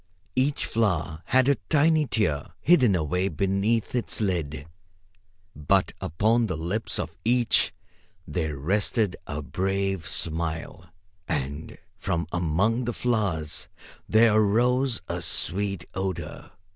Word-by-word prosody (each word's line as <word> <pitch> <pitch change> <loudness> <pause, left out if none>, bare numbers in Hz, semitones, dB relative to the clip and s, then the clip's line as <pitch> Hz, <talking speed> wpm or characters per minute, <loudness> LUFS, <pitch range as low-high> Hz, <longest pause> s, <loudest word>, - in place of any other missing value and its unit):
Each 140 +3 +1
flower 90 -8 0
had 130 +5 +3
a 140 - +3
tiny 155 0 +4
tear 80 - 0
hidden 125 - +4
away 90 +3 0
beneath 100 +6 0
its 125 -2 -2
lid, 80 -9 -2 0.9
but 75 -1 +1
upon 110 +8 +2
the 90 - -3
lips 90 +8 -2
of - - -3
each 120 0 +3 0.6
there 80 -5 -2
rested 100 - 0
a 75 +1 -4
brave 95 0 -1
smile. 85 +4 -2 0.4
And 70 +1 -3 0.2
from 85 -4 -1
among 95 +8 +1
the 120 - -2
flowers 100 -12 -1 0.4
there 110 0 +5
arose 120 +4 +2
a 85 0 -3
sweet 95 +3 0
odor. 95 -1 -4
95 Hz, 115 wpm, -26 LUFS, 80-115 Hz, 0.9 s, there